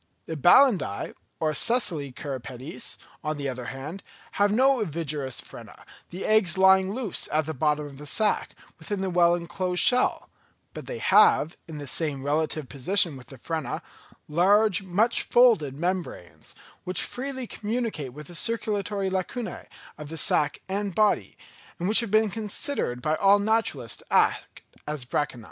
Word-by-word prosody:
The 160 Hz, -, -5 dB
Balanidæ 175 Hz, -, +3 dB, 0.3 s
or 155 Hz, -1 st, 0 dB
sessile 160 Hz, -, +2 dB
cirripedes, 130 Hz, +2 st, -6 dB, 0.3 s
on 155 Hz, 0 st, -2 dB
the 140 Hz, -1 st, -3 dB
other 125 Hz, -2 st, -5 dB
hand, 140 Hz, +9 st, -7 dB, 0.3 s
have 205 Hz, 0 st, +2 dB
no 260 Hz, +3 st, +3 dB
ovigerous 150 Hz, -, -2 dB
frena, -, -, -11 dB, 0.2 s
the 180 Hz, -, -6 dB
eggs 215 Hz, -4 st, +3 dB
lying 190 Hz, 0 st, +5 dB
loose 245 Hz, -8 st, -2 dB
at 155 Hz, 0 st, +1 dB
the 160 Hz, -, -4 dB
bottom 150 Hz, +1 st, 0 dB
of 140 Hz, -1 st, -11 dB
the 150 Hz, -, -9 dB
sack, 215 Hz, +7 st, 0 dB, 0.2 s
within 205 Hz, -3 st, -4 dB
the 190 Hz, -1 st, -2 dB
well 175 Hz, -1 st, +4 dB
enclosed 180 Hz, +1 st, -1 dB
shell; 250 Hz, 0 st, +3 dB, 0.5 s
but -, -, -9 dB
they -, -, -5 dB
have, 160 Hz, -, +4 dB
in 160 Hz, -2 st, -8 dB
the 145 Hz, -, -7 dB
same 140 Hz, -1 st, -1 dB
relative 155 Hz, 0 st, -1 dB
position 170 Hz, +4 st, +1 dB
with 130 Hz, -1 st, -12 dB
the 135 Hz, -, -11 dB
frena, 160 Hz, +2 st, -4 dB, 0.4 s
large, 195 Hz, +5 st, +3 dB
much 195 Hz, +5 st, +2 dB
folded 220 Hz, -, +3 dB
membranes, 175 Hz, -, -4 dB, 0.3 s
which 185 Hz, -1 st, 0 dB
freely 260 Hz, 0 st, -4 dB
communicate 215 Hz, -, -4 dB
with 150 Hz, +4 st, -10 dB
the 175 Hz, -, -12 dB
circulatory 205 Hz, -1 st, -1 dB
lacunæ 190 Hz, +5 st, -4 dB, 0.3 s
of 150 Hz, -1 st, -8 dB
the 165 Hz, -, -6 dB
sack 150 Hz, -1 st, +2 dB
and 195 Hz, -1 st, -3 dB
body, 210 Hz, -1 st, +1 dB, 0.4 s
and 175 Hz, 0 st, -2 dB
which 215 Hz, -, +5 dB
have 230 Hz, -3 st, -1 dB
been 215 Hz, 0 st, +3 dB
considered 210 Hz, -, -3 dB
by 155 Hz, -, +1 dB
all 200 Hz, +3 st, +5 dB
naturalists 205 Hz, -, 0 dB
to -, -, -15 dB
act -, -, +1 dB, 0.2 s
as 150 Hz, -4 st, -4 dB
branchiæ. 130 Hz, 0 st, -2 dB
175 Hz, 160 wpm, -26 LUFS, 150-210 Hz, 0.5 s, lying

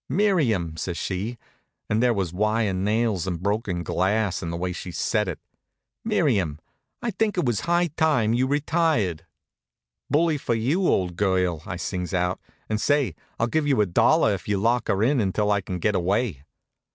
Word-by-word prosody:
"Miriam!" 130 Hz, -, +1 dB
says 85 Hz, +1 st, -3 dB
she, 100 Hz, +6 st, -3 dB, 0.5 s
and 110 Hz, +2 st, +1 dB
there 125 Hz, -1 st, +4 dB
was 95 Hz, -6 st, -1 dB
wire 105 Hz, +1 st, +1 dB
nails 105 Hz, -1 st, 0 dB
and 90 Hz, -3 st, -2 dB
broken 100 Hz, -2 st, -1 dB
glass 100 Hz, +2 st, 0 dB
in 85 Hz, -, -4 dB
the 85 Hz, -, -3 dB
way 90 Hz, +1 st, -2 dB
she 90 Hz, -, -7 dB
said 105 Hz, +5 st, 0 dB
it, 90 Hz, -, -3 dB, 0.7 s
"Miriam, 115 Hz, -, +1 dB, 0.5 s
I 235 Hz, -, 0 dB
think 210 Hz, 0 st, -1 dB
it 175 Hz, -, +1 dB
was 120 Hz, -5 st, +1 dB
high 175 Hz, +1 st, +2 dB
time 135 Hz, -9 st, +2 dB
you 125 Hz, +2 st, +2 dB
retired." 145 Hz, -, 0 dB, 0.8 s
"Bully 155 Hz, 0 st, +2 dB
for 120 Hz, -, -1 dB
you, 145 Hz, +12 st, +1 dB
old 90 Hz, -2 st, +1 dB
girl!" 90 Hz, -5 st, +1 dB
I -, -, -4 dB
sings 90 Hz, +1 st, -3 dB
out. 90 Hz, 0 st, 0 dB, 0.3 s
"And 110 Hz, 0 st, -1 dB
say, 145 Hz, -2 st, +2 dB, 0.3 s
I'll 115 Hz, -, +3 dB
give 145 Hz, +5 st, 0 dB
you 135 Hz, -5 st, +2 dB
a 105 Hz, -, +4 dB
dollar 115 Hz, -, +3 dB
if 95 Hz, -, -6 dB
you'll 100 Hz, -2 st, 0 dB
lock 120 Hz, +1 st, +1 dB
her 100 Hz, +2 st, +1 dB
in 135 Hz, +3 st, +3 dB
until 105 Hz, +1 st, 0 dB
I 100 Hz, -1 st, +2 dB
can 90 Hz, -1 st, -5 dB
get 105 Hz, +4 st, +1 dB
away." 95 Hz, -, 0 dB
105 Hz, 180 wpm, -24 LUFS, 90-130 Hz, 0.8 s, there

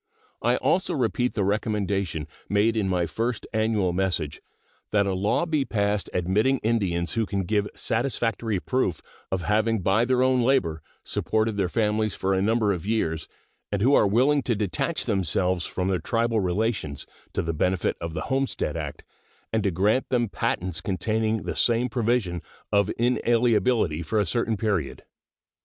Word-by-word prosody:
I -, -, +3 dB
also 185 Hz, -, +1 dB
repeat 125 Hz, -1 st, 0 dB
the 105 Hz, -, +1 dB
recommendation 100 Hz, -6 st, -1 dB, 0.2 s
made 105 Hz, +3 st, +2 dB
in 105 Hz, -4 st, 0 dB
my 90 Hz, -2 st, +1 dB
first 115 Hz, +6 st, -2 dB
annual 110 Hz, -5 st, +1 dB
message, 85 Hz, -5 st, -1 dB, 0.5 s
that 100 Hz, -1 st, +2 dB
a 100 Hz, -, 0 dB
law 100 Hz, -, +1 dB
be 155 Hz, -4 st, +1 dB
passed 105 Hz, -4 st, -1 dB
admitting 105 Hz, +9 st, +2 dB
Indians 95 Hz, -7 st, 0 dB
who 115 Hz, -2 st, 0 dB
can 100 Hz, -1 st, -1 dB
give 105 Hz, +2 st, 0 dB
satisfactory 115 Hz, -5 st, -1 dB
proof 110 Hz, -, -1 dB, 0.3 s
of 95 Hz, -2 st, -1 dB
having 110 Hz, +2 st, +1 dB
by 110 Hz, +6 st, +3 dB
their 130 Hz, 0 st, +2 dB
own 130 Hz, -1 st, +3 dB
labor 105 Hz, -12 st, +1 dB, 0.2 s
supported 110 Hz, 0 st, 0 dB
their 95 Hz, -3 st, 0 dB
families 110 Hz, 0 st, 0 dB
for 95 Hz, +1 st, 0 dB
a 95 Hz, -, +1 dB
number 110 Hz, 0 st, +2 dB
of 90 Hz, -, -5 dB
years, 90 Hz, -7 st, -1 dB, 0.4 s
and 100 Hz, -1 st, 0 dB
who 135 Hz, +4 st, +4 dB
are 105 Hz, -, +5 dB
willing 130 Hz, +8 st, +3 dB
to 120 Hz, -2 st, 0 dB
detach 105 Hz, -, -1 dB
themselves 95 Hz, -3 st, 0 dB
from 90 Hz, 0 st, -2 dB
their 95 Hz, -2 st, +1 dB
tribal 115 Hz, +5 st, 0 dB
relations, 95 Hz, -5 st, -1 dB, 0.3 s
to -, -, -1 dB
the 85 Hz, 0 st, -2 dB
benefit 90 Hz, +3 st, 0 dB
of 85 Hz, -1 st, -4 dB
the -, -, -2 dB
homestead 135 Hz, 0 st, -1 dB
act, -, -, -5 dB, 0.5 s
and 110 Hz, -, +2 dB
to 100 Hz, -, +1 dB
grant 100 Hz, +8 st, +1 dB
them 120 Hz, -3 st, +1 dB
patents 90 Hz, -3 st, -2 dB
containing 110 Hz, +3 st, -1 dB
the -, -, -4 dB
same 120 Hz, +1 st, +2 dB
provision 115 Hz, -7 st, 0 dB, 0.3 s
of 100 Hz, -1 st, +3 dB
inalienability 115 Hz, -7 st, +2 dB
for 110 Hz, +6 st, 0 dB
a 105 Hz, -, +2 dB
certain 115 Hz, -1 st, 0 dB
period. 95 Hz, -9 st, -1 dB
105 Hz, 165 wpm, -25 LUFS, 95-115 Hz, 0.5 s, are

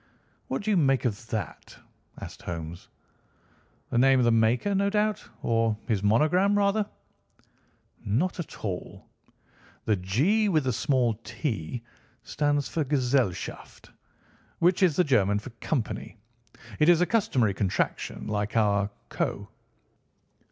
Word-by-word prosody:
"What 135 Hz, -, -3 dB
do 215 Hz, -, 0 dB
you 200 Hz, -, +3 dB
make 135 Hz, -5 st, +2 dB
of 110 Hz, -1 st, -2 dB
that?" 105 Hz, -4 st, -5 dB, 0.4 s
asked -, -, -9 dB
Holmes. 85 Hz, 0 st, -6 dB, 1.0 s
"The 120 Hz, -, +2 dB
name 135 Hz, +1 st, +5 dB
of 125 Hz, -, +3 dB
the 120 Hz, -, +4 dB
maker, 115 Hz, -, +2 dB
no 200 Hz, +1 st, +2 dB
doubt; 210 Hz, 0 st, 0 dB
or 115 Hz, -2 st, +1 dB
his 105 Hz, -5 st, 0 dB
monogram, 155 Hz, -, +3 dB
rather." 200 Hz, +1 st, +1 dB, 1.1 s
"Not 145 Hz, -, 0 dB
at 165 Hz, -, -7 dB
all. 95 Hz, -4 st, -5 dB, 0.8 s
The 110 Hz, -, +3 dB
'G' 145 Hz, -, +1 dB
with 155 Hz, -6 st, +2 dB
the 130 Hz, -2 st, 0 dB
small 125 Hz, 0 st, +1 dB
't' 115 Hz, -, -4 dB, 0.4 s
stands 145 Hz, -1 st, 0 dB
for 160 Hz, -, -1 dB
'Gesellschaft,' 130 Hz, -, -1 dB, 0.7 s
which 175 Hz, +3 st, +2 dB
is 175 Hz, -6 st, +4 dB
the 180 Hz, -, +4 dB
German 105 Hz, -, +2 dB
for 115 Hz, +5 st, -7 dB
'Company.' 115 Hz, -1 st, -3 dB, 0.6 s
It 150 Hz, -, +5 dB
is 175 Hz, -2 st, +6 dB
a -, -, +5 dB
customary 170 Hz, -, +1 dB
contraction 95 Hz, -1 st, -2 dB
like 105 Hz, +1 st, -2 dB
our 100 Hz, -2 st, +2 dB, 0.2 s
'Co. -, -, -3 dB
130 Hz, 130 wpm, -27 LUFS, 105-175 Hz, 1.1 s, is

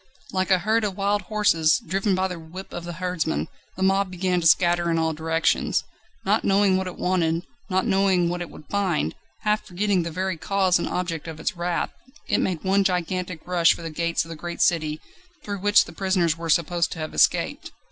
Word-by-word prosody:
Like 185 Hz, 0 st, 0 dB
a 190 Hz, -, +5 dB
herd 220 Hz, +5 st, +1 dB
of 200 Hz, -2 st, -2 dB
wild 205 Hz, +1 st, +1 dB
horses, 180 Hz, -6 st, +3 dB
driven 195 Hz, +3 st, 0 dB
by 190 Hz, 0 st, +1 dB
the 180 Hz, -2 st, -6 dB
whip 170 Hz, +4 st, -10 dB
of 175 Hz, -, -6 dB
the 175 Hz, -, -5 dB
herdsmen, 180 Hz, -2 st, -2 dB, 0.3 s
the 190 Hz, -, -1 dB
mob 195 Hz, 0 st, +2 dB
began 180 Hz, 0 st, 0 dB
to 165 Hz, -, +3 dB
scatter 175 Hz, 0 st, +4 dB
in 165 Hz, -, +1 dB
all 160 Hz, 0 st, +1 dB
directions. 160 Hz, +1 st, 0 dB, 0.4 s
Not -, -, +2 dB
knowing 195 Hz, -1 st, +3 dB
what 190 Hz, 0 st, -1 dB
it 180 Hz, -, -7 dB
wanted, 170 Hz, -2 st, 0 dB, 0.3 s
not 190 Hz, -1 st, +1 dB
knowing 190 Hz, -2 st, +3 dB
what 175 Hz, +1 st, -2 dB
it 175 Hz, -, -5 dB
would 150 Hz, -, -13 dB
find, 185 Hz, -, 0 dB, 0.3 s
half 210 Hz, 0 st, +1 dB
forgetting 195 Hz, 0 st, 0 dB
the 170 Hz, -, -3 dB
very 185 Hz, +1 st, -2 dB
cause 190 Hz, 0 st, +2 dB
and -, -, -2 dB
object 170 Hz, -3 st, -3 dB
of 160 Hz, -1 st, -7 dB
its -, -, -2 dB
wrath, 175 Hz, 0 st, -1 dB, 0.4 s
it -, -, +2 dB
made 180 Hz, -4 st, -1 dB
one 195 Hz, +1 st, +3 dB
gigantic 180 Hz, -2 st, -2 dB
rush 175 Hz, -2 st, +4 dB
for -, -, -10 dB
the 165 Hz, -, -5 dB
gates 170 Hz, +1 st, -1 dB
of -, -, -13 dB
the 165 Hz, -, -6 dB
great 170 Hz, +2 st, -2 dB
city 155 Hz, -2 st, +1 dB, 0.4 s
through 205 Hz, -1 st, -4 dB
which 205 Hz, +2 st, +5 dB
the -, -, -11 dB
prisoners 185 Hz, -4 st, +1 dB
were 165 Hz, 0 st, -6 dB
supposed 170 Hz, +1 st, +2 dB
to -, -, -10 dB
have 155 Hz, -1 st, -5 dB
escaped. -, -, +1 dB
180 Hz, 210 wpm, -24 LUFS, 165-190 Hz, 0.4 s, a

